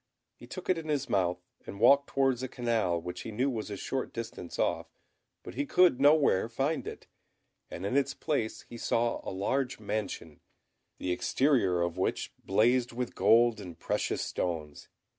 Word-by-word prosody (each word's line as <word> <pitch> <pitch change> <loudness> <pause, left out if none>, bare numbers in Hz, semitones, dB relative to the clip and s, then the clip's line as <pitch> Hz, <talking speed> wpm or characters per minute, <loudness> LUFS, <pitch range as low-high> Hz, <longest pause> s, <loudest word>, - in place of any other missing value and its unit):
He - - -14
took 185 - -8
it 180 -3 +2
in 160 - -8
his 145 -3 -1
mouth, 90 -2 +1 0.3
and 100 - -7
walked 140 +5 +6
towards 135 -2 +1
a 130 - -2
canal 115 -9 0
which 90 +1 -6
he - - -6
knew 130 +6 0
was 110 -3 -4
a 100 - -5
short 130 +6 -3
distance 115 -6 -7
off; - - 0 0.6
but - - -8
he 140 +3 -2
could 180 -8 +4
nowhere 145 -8 +4
find 135 +7 -1
it, - - -8 0.6
and 90 - -6
in 100 - -1
its 140 -1 +1
place 140 -8 -2
he 120 - -9
saw 115 +1 0
a - - -4
large 125 +8 -1
mansion, 100 -7 -4 0.6
the 90 - -3
exterior 90 -1 +2
of 85 +1 -3
which - - -1
blazed 120 +5 +2
with 125 +1 -4
gold 115 -1 +4
and 90 -4 -9
precious - - -1
stones. 80 -4 -4
115 Hz, 175 wpm, -30 LUFS, 95-135 Hz, 0.6 s, walked